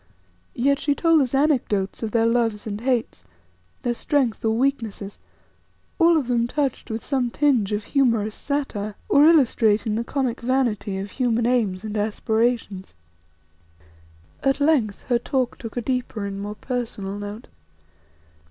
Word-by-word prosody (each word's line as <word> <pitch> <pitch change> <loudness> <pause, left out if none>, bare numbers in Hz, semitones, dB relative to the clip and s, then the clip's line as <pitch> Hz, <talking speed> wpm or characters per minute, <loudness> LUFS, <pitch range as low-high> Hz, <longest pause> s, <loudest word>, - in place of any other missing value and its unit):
Yet 280 +3 +2
she 285 -1 0
told 330 -1 +4
us 265 0 0
anecdotes 255 -9 +1
of 225 - -2
their 225 +1 +2
loves 230 -3 +1
and 210 -1 -5
hates, 240 - -1 0.6
their 240 - 0
strength 250 -3 0
or 220 0 +1
weaknesses, 230 -7 -2 0.8
all 335 -1 +5
of 290 - 0
them 235 -1 +1
touched 275 -1 -2
with 220 0 -4
some 260 -4 0
tinge 250 -7 +2
of 210 0 -1
humorous 230 -5 +1
satire, 215 -9 -3
or 285 - +5
illustrating 230 -8 +4
the 225 +2 -1
comic 255 -1 -2
vanity 235 -6 0
of 195 +1 -5
human 240 -3 0
aims 220 -6 +1
and 215 -1 -5
aspirations. 220 - -1 1.5
At 270 +1 +1
length 285 -9 +1
her 240 -2 +1
talk 255 0 -1
took 225 0 -8
a - - 0
deeper 245 -4 -2
and 200 0 -5
more 205 +1 -5
personal 215 -6 -4
note. 205 +3 -7
235 Hz, 145 wpm, -23 LUFS, 210-270 Hz, 1.5 s, all